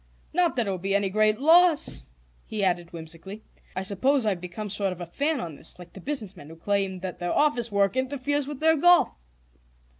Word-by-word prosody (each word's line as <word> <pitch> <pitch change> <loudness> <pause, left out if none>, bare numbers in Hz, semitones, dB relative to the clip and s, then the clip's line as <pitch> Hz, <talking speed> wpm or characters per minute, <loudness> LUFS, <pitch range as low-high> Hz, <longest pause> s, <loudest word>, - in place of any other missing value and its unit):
Not 350 0 +2
that 240 -3 0
it - - -3
will 185 - -3
be 195 +2 -1
any 200 -1 +1
great 215 +1 +2
loss," 315 - +4 0.4
he 210 -2 -3
added 175 -2 0
whimsically. 170 +6 -8 0.3
"I 185 - -2
suppose 250 +7 +2
I've 195 -5 0
become 180 +4 -6
a - - -6
sort 195 -3 -2
of 175 -1 -8
fan 295 +1 0
on 165 -9 -5
this, - - -5
like 175 -1 -13
the 190 - -11
business 240 -9 -4
men 150 -4 -12
who 165 - -11
claim 195 +2 -1
that 185 -1 -6
their 175 0 -2
office 245 -6 +1
work 200 +2 +2
interferes 275 +2 -1
with 290 -1 -7
their 320 0 +4
golf." 350 +4 +5
205 Hz, 210 wpm, -26 LUFS, 180-280 Hz, 0.4 s, golf